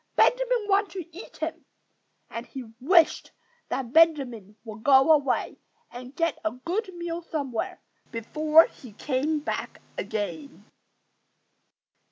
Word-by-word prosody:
Benjamin - - +3
wanted 400 0 +2
to 345 -4 -8
eat 390 - -11
him! - - -4 0.6
And 230 +1 -7
he 265 - -7 0.2
wished 325 +4 +3 0.4
that 255 -2 -3
Benjamin 270 - +3
would 220 -2 -9
go 270 +3 +6
away 280 -5 +1 0.3
and 250 +2 -10
get 330 -1 0
a 325 - +1
good 355 - -4
meal 345 0 -4
somewhere 280 -8 -4 0.3
before 305 +8 +4
he 245 -5 -13
came 295 +7 -1
back - - -4 0.2
again. 275 +7 -5
300 Hz, 120 wpm, -26 LUFS, 250-335 Hz, 0.6 s, go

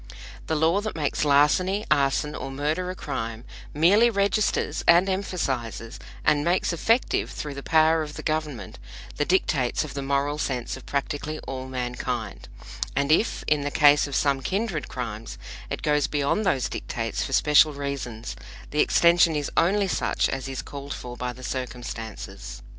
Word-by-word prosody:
The 160 - 0
law 165 +6 +2
that 215 0 -4
makes 150 -2 -1
larceny, 150 +8 +3
arson 145 0 +2
or - - -5
murder 150 +6 -2
a 185 - -4
crime 115 -7 -5 0.3
merely 195 +10 +5
registers, 205 0 0
and 175 +3 +6
emphasizes, 135 - -3 0.3
and 145 -1 +3
makes 175 +2 +1
effective 225 +9 +1
through 150 -1 -5
the 140 - -7
power 160 +2 +3
of 150 -1 -6
the - - -7
Government, 150 - -3 0.4
the 145 - +1
dictates 145 -9 +1
of 155 - -7
the 140 - -4
moral 140 +2 0
sense 125 -5 -2
of 130 - -12
practically 145 +2 -2
all 130 -1 -6
mankind; 125 -4 -4 0.5
and 140 +2 +1
if, 190 +8 +2
in 150 -1 +2
the 145 - -2
case 145 0 +5
of 140 - -5
some 140 -1 +2
kindred 195 - -2
crimes, 115 -3 -6 0.3
it - - -4
goes 150 -2 +2
beyond 145 +9 0
those 135 -8 +1
dictates - - -3
for - - -5
special 150 +1 +5
reasons, 140 -5 -5 0.4
the 150 - -1
extension 170 0 +5
is 145 -1 -2
only 195 +4 +3
such - - 0
as 135 0 -3
is 135 - -4
called 140 0 -7
for 125 0 -8
by 125 0 -3
the 130 +1 -12
circumstances. 115 - -6
145 Hz, 165 wpm, -25 LUFS, 130-165 Hz, 0.5 s, and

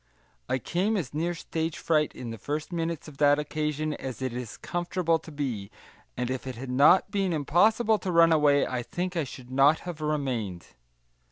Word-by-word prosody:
I - - +2
came 190 - 0
as 145 -10 -4
near 170 +3 -1
stage 160 -1 -3
fright 155 -2 +1
in 120 -2 -6
the 115 - -7
first 150 - -4
minutes 165 -2 -3
of 145 -3 -12
that 145 -1 +5
occasion 150 0 -2
as 130 -5 -6
it 130 -2 -3
is 120 -3 -6
comfortable 175 -1 -1
to 160 - -12
be, 125 -9 -3 0.5
and 125 0 -1
if 130 0 -4
it 130 - -4
had 125 +2 -6
not 145 +9 +5
been 195 -3 0
impossible 210 - +3
to 185 0 -3
run 165 -1 +6
away 145 -2 +4
I 125 -1 -2
think 180 +7 -4
I 165 -3 0
should 130 -1 -11
not 140 +4 +4
have 175 -3 -7
remained. 130 - -2
150 Hz, 190 wpm, -27 LUFS, 130-170 Hz, 0.5 s, run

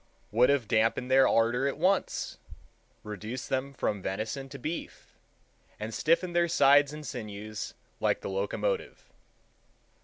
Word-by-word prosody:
would 120 +4 +4
have 140 -6 +2
damped 115 +3 +1
their 135 0 +6
ardor 120 +4 +2
at 140 - -2
once, 185 +4 0 0.6
reduced 105 +4 -6
them 135 +1 -1
from 105 -6 -2
venison 110 +9 -4
to 140 - -8
beef, 155 +6 -6 0.7
and 110 +1 -5
stiffened 170 - +1
their 170 0 +4
sides 145 -3 +5
and 150 0 -8
sinews 105 -4 -6 0.2
like - - +1
the - - -5
locomotive. 105 - -2
130 Hz, 130 wpm, -29 LUFS, 110-145 Hz, 0.7 s, their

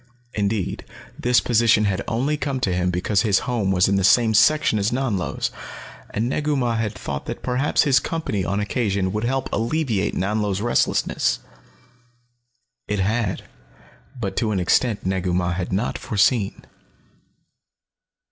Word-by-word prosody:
Indeed, 100 -2 -2 0.4
this 125 0 +3
position 115 -2 +3
had 95 -2 0
only 130 +6 0
come 140 -3 -2
to 95 -7 0
him 90 0 0
because 90 +3 +1
his 100 -3 +3
home 115 -6 -1
was 90 -1 +3
in 100 0 +2
the 95 - 0
same 110 +3 +4
section 115 +1 +4
as 100 +1 +1
Nanlo's, 120 -8 -1 0.6
and 110 +3 -2
Negu 150 +3 0
Mah 120 -4 0
had 110 -1 -2
thought 70 -1 -5
that - - -6
perhaps 130 +3 +1
his 135 -2 +4
company 145 - -3
on 100 +2 -1
occasion 100 -3 -1
would 105 +2 -1
help 135 +1 -1
alleviate 115 -2 0
Nanlo's 105 0 -1
restlessness. 105 - +1 1.5
It 105 - -1
had 100 +1 -1 0.8
but 100 -4 -3
to 110 - +1
an 100 -3 0
extent 105 +5 +1
Negu 95 -1 -1
Mah 90 -1 0
had 90 0 -4
not 100 +5 -1
foreseen. 105 0 +1
105 Hz, 145 wpm, -22 LUFS, 95-120 Hz, 1.5 s, same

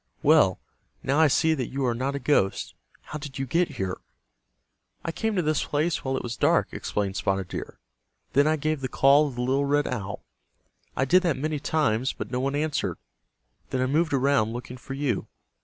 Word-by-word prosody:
"Well, - - +5 0.4
now 140 +3 +1
I 160 - +7
see 160 +3 +3
that 130 -6 -2
you 135 0 -2
are 120 - +2
not 130 +4 -2
a - - -2
ghost. 125 -8 +1 0.3
How 150 - -7
did 145 -2 -8
you 135 - -2
get 165 +4 +1
here?" 95 -2 -2 1.1
"I 165 - -1
came 220 +5 -2
to 180 - +1
this 155 -1 +1
place 155 +2 -1
while 130 0 -1
it - - -4
was 120 -1 -4
dark," - - +2
explained 100 -2 -2
Spotted 95 0 -1
Deer. - - -6 0.6
"Then 140 +3 +4
I 155 - +3
gave 155 -1 -1
the 130 - -1
call 140 +4 +5
of 135 - -7
the 120 - -3
little 135 +3 +1
red 145 +1 +2
owl. 100 -5 -4 0.7
I 135 - +2
did 180 +7 +5
that 170 -6 0
many 150 +2 -2
times, 135 -5 +1
but 105 - -7
no 125 - -1
one 135 +2 -1
answered. 150 0 -1 0.7
Then 130 - -1
I 130 - +2
moved 155 +5 +1
around 135 -5 +2
looking 125 +1 -7
for 135 +2 -7
you. 135 -7 -1
135 Hz, 205 wpm, -26 LUFS, 125-150 Hz, 1.1 s, I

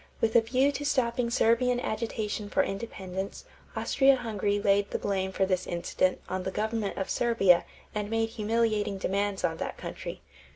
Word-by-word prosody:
With 220 -1 +1
a 235 - +8
view 255 +5 +2
to 285 - -4
stopping 245 -4 +1
Serbian 245 +1 +3
agitation 215 -2 -3
for - - +3
independence, 195 -2 -5 0.3
Austria 270 0 +4
Hungary 210 -4 -1
laid 200 0 +2
the - - -1
blame 190 -1 -1
for 190 - +1
this 185 -1 -1
incident 175 +1 0
on 185 0 -2
the 185 - -3
government 215 +1 -2
of 190 - -2
Serbia 195 -7 +3 0.3
and 210 -1 -3
made 225 0 0
humiliating 215 -2 0
demands 200 +1 -1
on 160 -1 0
that - - -4
country. - - -7
210 Hz, 165 wpm, -28 LUFS, 195-235 Hz, 0.3 s, a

